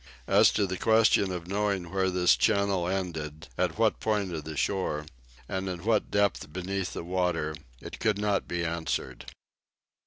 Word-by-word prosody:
As - - +6
to 100 - +2
the 95 -1 -4
question 110 -3 +4
of 90 -2 -5
knowing 100 -3 -1
where 95 -1 +1
this 90 -1 +4
channel 100 -4 +2
ended, 80 -5 -4
at 90 -1 -1
what 110 -1 +2
point 105 -4 0
of 80 -3 -5
the 80 -1 -6
shore, 75 -1 -1 0.4
and 95 0 -3
at 90 -2 -5
what 110 -2 +2
depth 100 -6 0
beneath 95 +2 -3
the - - -5
water, 90 -3 -1 0.2
it - - -9
could 105 -2 +1
not 105 -1 0
be 85 -1 -2
answered. 80 -6 -3
95 Hz, 165 wpm, -28 LUFS, 85-100 Hz, 0.4 s, As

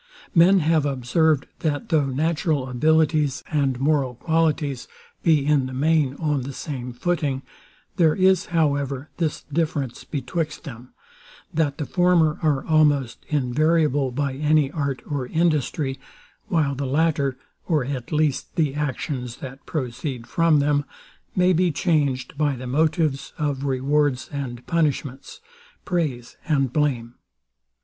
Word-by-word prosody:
Men 180 +2 +6
have 160 -1 +2
observed, 140 +2 +1
that 145 -3 -2
though 155 -5 +2
natural 155 0 0
abilities 155 +2 +2
and 140 -5 +1
moral 135 -3 +1
qualities 155 -2 0 0.3
be 155 -4 +3
in 145 -3 +2
the 130 - -7
main 150 -1 +2
on 150 -3 -1
the 135 +2 -6
same 125 -3 -5
footing, 140 0 -1 0.5
there 160 -4 +4
is, 190 -1 +3
however, 145 -4 0
this 160 -4 -2
difference 150 -4 -2
betwixt 155 +3 -3
them, 125 -5 -9 0.6
that 150 -3 0
the 150 - -3
former 175 -3 +3
are 150 -4 +1
almost 145 -6 +2
invariable 150 0 +2
by 140 +2 -2
any 150 0 +2
art 140 -4 -3
or 140 -4 -3
industry; 150 -3 0 0.5
while 160 -8 +1
the 140 0 -3
latter, 140 -2 +1 0.3
or 155 -7 +1
at 130 -3 -5
least, 150 -3 0
the 155 -5 +1
actions, 130 -3 -3
that 135 0 -9
proceed 125 -3 -4
from 165 +1 +3
them, 145 0 +2 0.5
may 180 0 +4
be 180 +1 +2
changed 145 -6 0
by 145 -2 +2
the 130 +1 -8
motives 150 0 0
of 145 -2 -2
rewards 140 0 +1
and 125 -4 -5
punishments, 145 - -2 0.4
praise 145 -10 -2
and 135 -5 +1
blame. 125 -6 0
145 Hz, 130 wpm, -23 LUFS, 135-160 Hz, 0.6 s, Men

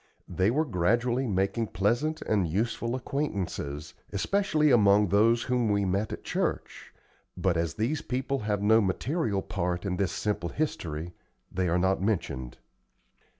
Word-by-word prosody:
They 95 +2 +1
were 150 +7 +1
gradually 120 - +1
making 100 +3 0
pleasant 120 - 0
and 100 -5 +1
useful 115 +7 -1
acquaintances, 100 - -3 0.2
especially 155 - +2
among 105 -4 +5
those 115 +5 +4
whom 125 -3 +1
we 100 -1 +2
met 100 +3 0
at - - -6
church; - - -3 0.5
but 90 0 +1
as 85 0 -1
these 125 +8 -1
people 130 +2 -2
have 105 -1 -1
no 110 +2 +5
material 105 - -1
part 90 -1 -2
in 90 -2 -1
this 95 -2 0
simple 105 -5 -2
history, 85 - -3 0.4
they 90 -1 0
are 85 - +2
not 95 +1 +1
mentioned. 85 - -2
105 Hz, 145 wpm, -28 LUFS, 90-120 Hz, 0.5 s, among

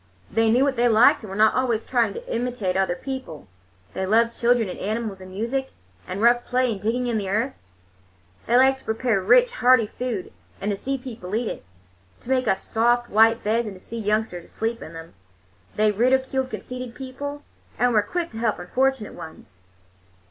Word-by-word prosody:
They 225 +1 +2
knew 245 +4 +4
what 275 -2 0
they 240 +1 +4
liked, 225 +1 +5
and 215 - -9
were 190 - -6
not 215 +1 +4
always 240 -4 0
trying 235 -5 +1
to - - -7
imitate 235 -6 -2
other 190 -2 +1
people. 260 - -7 0.5
They - - -3
loved 230 +3 +3
children 235 -2 +2
and 180 - -7
animals 215 -1 -3
and 185 - -10
music, 235 +8 -3 0.3
and 190 +4 -4
rough 240 +1 +5
play 250 -1 +1
and 200 -3 -5
digging 240 +4 0
in 235 -3 0
the 195 -2 -4
earth. 225 +7 0 0.9
They 240 - +4
liked 265 +1 +4
to - - -22
prepare 220 -2 0
rich, - - +5
hearty 255 - +4
food 230 -3 -5 0.3
and 205 - -1
to - - 0
see 270 +7 -3
people 235 -7 -7
eat 235 +1 -1
it; - - -7 0.6
to 255 - -7
make 255 -2 +1
up 190 - +3
soft 240 +4 0
white 225 +2 +4
beds 225 +2 +1
and 200 - -7
to - - -13
see 230 +4 -7
youngsters 210 -4 -1
asleep 230 +1 -3
in 160 - -9
them. 165 0 -10 0.6
They 215 0 +3
ridiculed 260 +4 +1
conceited 250 -2 -7
people 285 +2 -6 0.3
and 245 0 +2
were 215 - +5
quick 340 +10 -3
to 225 - -7
help 225 -2 0
unfortunate 255 +5 -1
ones. 105 - -12
230 Hz, 195 wpm, -24 LUFS, 210-255 Hz, 0.9 s, liked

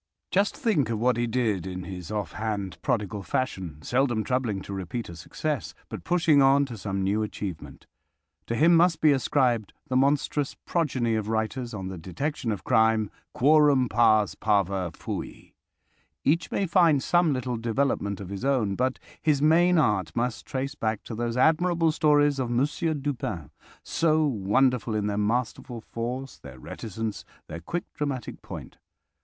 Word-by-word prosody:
Just 200 +2 +1
think 180 - +1
of 115 - -1
what 125 +2 +2
he 120 +1 0
did 110 -7 0
in 90 0 -5
his 90 -2 -7
offhand, 100 -2 -3
prodigal 105 -2 -1
fashion, 90 - -3
seldom 120 - +1
troubling 120 -4 -1
to 100 - -7
repeat 95 +4 -4
a 85 - -8
success, 140 - -4
but - - -7
pushing 165 -5 +3
on 135 +1 +5
to 125 -4 -7
some 95 -1 -3
new 100 +3 +1
achievement. 100 -5 -6 0.6
To 115 - -1
him 165 +6 +5
must 170 0 +4
be 155 - +5
ascribed 125 -5 +1 0.2
the 130 - -1
monstrous 140 +1 +1
progeny 130 -9 0
of 110 -1 -1
writers 115 +3 -2
on 95 -2 -5
the 95 -2 -7
detection 115 - -3
of 100 -4 -4
crime—"quorum 125 +5 +3
pars 110 -2 +4
parva 100 -3 0
fui!" - - -7 0.7
Each 165 +4 +1
may 200 - 0
find 165 -6 +4
some 175 -2 +3
little 125 -2 -2
development 115 -3 -1
of 95 -3 -7
his 100 +2 -6
own, 130 -7 +1
but 130 +5 0 0.2
his 150 -3 +2
main 170 +4 +4
art 105 - +1
must 120 0 -2
trace 135 +1 -3
back 110 -6 -2
to - - -7
those 120 +1 -2
admirable 165 +3 +3
stories 145 -2 +3
of 125 -2 -1
Monsieur 150 +6 0
Dupin, 130 - -4 0.3
so 155 -1 +2
wonderful 120 -1 +1
in 105 -1 0
their 105 0 -1
masterful 115 +2 -1
force, 125 +4 -5
their 65 -2 -11
reticence, 110 - -5 0.2
their 85 +2 -7
quick 175 - -3
dramatic 140 -4 -4
point. - - -9
120 Hz, 160 wpm, -26 LUFS, 105-145 Hz, 0.7 s, on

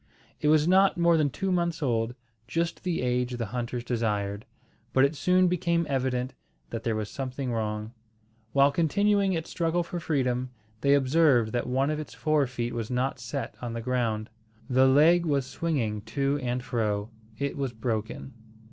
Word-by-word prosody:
It - - 0
was 155 +1 +4
not 190 +1 +4
more 170 -1 +4
than 155 -3 +2
two 195 +7 -2
months 170 -3 0
old, 120 -2 0 0.3
just 165 +4 -2
the 175 -7 -1
age 125 0 0
the 115 - -2
hunters 120 0 -3
desired, 105 -4 -2 0.5
but 130 +1 +5
it 140 +3 -1
soon 180 +4 +3
became 170 -1 +1
evident 130 -2 -1 0.4
that 115 - -3
there 115 -2 -1
was 110 -1 -2
something 130 +1 -4
wrong. 110 0 -3 0.6
While 140 +2 +5
continuing 195 +5 +2
its 165 -2 -3
struggle 170 +1 0
for 175 +1 -5
freedom, 130 -5 0 0.3
they 140 +3 +4
observed 135 -4 +3
that 120 0 -1
one 135 +3 +1
of 155 - -2
its 155 - -7
fore 155 -3 +2
feet 120 -1 -3
was 115 -2 -3
not 130 +2 -1
set 120 -1 -4
on 120 -2 -4
the 115 - -3
ground. 115 -3 -1 0.4
The 130 0 +4
leg 160 +6 +5
was 140 -5 +1
swinging 130 -9 -2 0.2
to 140 +1 +1
and 125 0 -2
fro. 110 -3 -1 0.3
It 140 +2 -2
was 135 -3 -2
broken. 110 - -4
130 Hz, 175 wpm, -27 LUFS, 120-160 Hz, 0.6 s, but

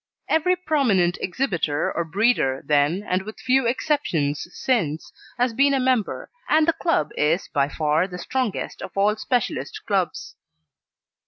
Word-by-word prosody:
Every 360 +3 +2
prominent 240 - +1
exhibitor 175 - -1
or 170 - 0
breeder 165 - +1
then, 150 +6 +2
and 185 +1 +1
with 215 +3 -9
few 260 -1 +2
exceptions 175 - -1
since, 165 - -1 0.2
has 245 -1 +1
been 275 +3 +3
a - - +1
member, 255 -4 0 0.2
and 310 +1 +4
the 330 - +4
club 155 - 0
is 160 +5 +1
by 140 -2 +1
far 155 +3 +1
the 180 -2 -8
strongest 255 +3 -3
of - - -5
all 205 +2 +3
specialist 220 +2 -2
clubs. - - -2
205 Hz, 145 wpm, -23 LUFS, 160-260 Hz, 0.2 s, and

